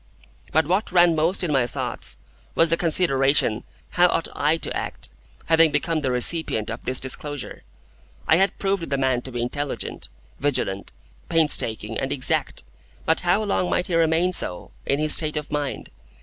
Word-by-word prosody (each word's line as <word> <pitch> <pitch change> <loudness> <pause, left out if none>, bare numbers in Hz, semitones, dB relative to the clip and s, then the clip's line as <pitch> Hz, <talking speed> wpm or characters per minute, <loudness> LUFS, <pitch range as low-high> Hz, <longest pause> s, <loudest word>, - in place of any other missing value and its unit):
But 160 0 +2
what 185 +6 0
ran 175 -2 +4
most 165 +5 0
in 170 - -1
my 130 -4 +2
thoughts - - -3 0.4
was 165 -1 +4
the - - +5
consideration 140 -9 +1 0.3
how 180 0 +4
ought 165 - -1
I 150 +3 +1
to - - -3
act, - - -5 0.4
having 160 -1 +4
become 155 +2 0
the 140 -3 -2
recipient 125 -3 +1
of 115 - -7
this 130 0 +1
disclosure? 145 +2 -1 0.7
I 160 - +5
had 195 +2 +1
proved 195 -5 -2
the 140 - 0
man 130 -2 +1
to 130 - -9
be 120 -1 -3
intelligent, 145 +3 -4 0.3
vigilant, 125 -8 -1 0.4
painstaking, 115 -9 0
and 135 - -3
exact; 135 - -1 0.4
but 160 - +3
how 180 +4 +1
long 195 -3 0
might 180 - 0
he 180 - -5
remain 165 +2 +2
so, 90 - -2 0.2
in 140 - +1
his 155 0 +5
state 155 -1 +2
of 150 0 -5
mind? 145 -2 -4
150 Hz, 170 wpm, -23 LUFS, 130-170 Hz, 0.7 s, the